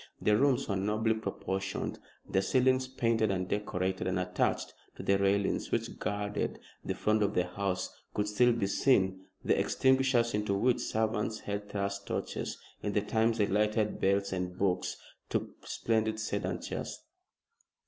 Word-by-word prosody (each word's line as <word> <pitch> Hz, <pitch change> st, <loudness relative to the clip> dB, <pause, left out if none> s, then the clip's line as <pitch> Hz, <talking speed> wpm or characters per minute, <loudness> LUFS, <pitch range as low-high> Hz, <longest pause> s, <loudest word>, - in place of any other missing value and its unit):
The 105 Hz, -, +3 dB
rooms 135 Hz, +2 st, +3 dB
were 100 Hz, -, 0 dB
nobly 105 Hz, +3 st, +1 dB
proportioned, 95 Hz, -3 st, -3 dB, 0.3 s
their 95 Hz, -, +2 dB
ceilings 130 Hz, +4 st, +3 dB
painted 115 Hz, -4 st, +1 dB
and 95 Hz, -1 st, -1 dB
decorated, 95 Hz, -2 st, -1 dB
and 95 Hz, 0 st, 0 dB
attached 90 Hz, 0 st, 0 dB, 0.2 s
to -, -, -7 dB
the 100 Hz, 0 st, +3 dB
railings 100 Hz, 0 st, +1 dB
which -, -, -2 dB
guarded 105 Hz, 0 st, -2 dB, 0.3 s
the -, -, -2 dB
front 110 Hz, 0 st, +2 dB
of 105 Hz, 0 st, +1 dB
the 90 Hz, -, +3 dB
house 95 Hz, 0 st, -2 dB, 0.2 s
could 105 Hz, 0 st, +1 dB
still 120 Hz, +4 st, +4 dB
be 115 Hz, -4 st, 0 dB
seen 95 Hz, -4 st, +2 dB, 0.2 s
the -, -, +3 dB
extinguishers 130 Hz, -3 st, +3 dB
into 105 Hz, -1 st, 0 dB
which 120 Hz, +5 st, +2 dB
servants 110 Hz, 0 st, -1 dB
had 100 Hz, 0 st, -4 dB
thrust 100 Hz, 0 st, -3 dB
torches -, -, -3 dB, 0.2 s
in 105 Hz, -, -2 dB
the 105 Hz, -, +2 dB
times 110 Hz, +2 st, +1 dB
they 105 Hz, -, +3 dB
lighted 105 Hz, +1 st, +1 dB
belles 100 Hz, 0 st, +2 dB
and 90 Hz, -1 st, -3 dB
beaux 90 Hz, -2 st, +2 dB, 0.5 s
to -, -, -2 dB
splendid 110 Hz, -1 st, 0 dB
sedan 110 Hz, -, -2 dB
chairs. -, -, -5 dB
105 Hz, 155 wpm, -31 LUFS, 95-110 Hz, 0.5 s, still